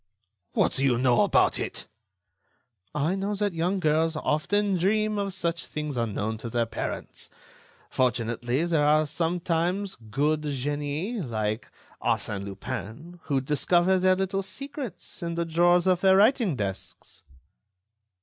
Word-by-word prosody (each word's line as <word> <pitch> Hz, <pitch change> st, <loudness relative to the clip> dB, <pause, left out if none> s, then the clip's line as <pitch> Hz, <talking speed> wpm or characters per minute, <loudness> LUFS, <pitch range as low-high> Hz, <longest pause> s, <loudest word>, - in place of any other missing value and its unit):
"What -, -, +2 dB
do 135 Hz, -, +1 dB
you 130 Hz, -3 st, +3 dB
know 125 Hz, -1 st, +3 dB
about -, -, +3 dB
it?" -, -, -4 dB, 1.1 s
"I 150 Hz, +4 st, +1 dB
know 200 Hz, +2 st, -2 dB
that 205 Hz, -1 st, -1 dB
young 175 Hz, +4 st, 0 dB
girls 160 Hz, 0 st, +2 dB
often 195 Hz, +7 st, +1 dB
dream 215 Hz, +3 st, +1 dB
of 200 Hz, -1 st, -1 dB
such 170 Hz, -3 st, -2 dB
things 150 Hz, -2 st, -4 dB
unknown 110 Hz, -2 st, -2 dB
to 115 Hz, -, -5 dB
their 120 Hz, 0 st, +1 dB
parents. 115 Hz, -, -5 dB, 0.6 s
Fortunately, 120 Hz, +3 st, 0 dB
there 165 Hz, -4 st, +2 dB
are 155 Hz, +1 st, +4 dB
sometimes 175 Hz, +4 st, -1 dB
good 150 Hz, +6 st, +1 dB
genii 145 Hz, -, -2 dB
like 110 Hz, -4 st, -2 dB, 0.3 s
Arsène 100 Hz, -1 st, -1 dB
Lupin 110 Hz, -, -7 dB
who 140 Hz, -3 st, +1 dB
discover 175 Hz, +6 st, +2 dB
their 185 Hz, 0 st, +4 dB
little 190 Hz, +1 st, -1 dB
secrets 270 Hz, +4 st, -6 dB
in 170 Hz, -1 st, -3 dB
the 170 Hz, 0 st, -1 dB
drawers 175 Hz, +2 st, +3 dB
of 185 Hz, -1 st, +3 dB
their 190 Hz, 0 st, +6 dB
writing 215 Hz, -, +4 dB
desks." 100 Hz, -5 st, -6 dB
165 Hz, 135 wpm, -27 LUFS, 130-190 Hz, 1.1 s, their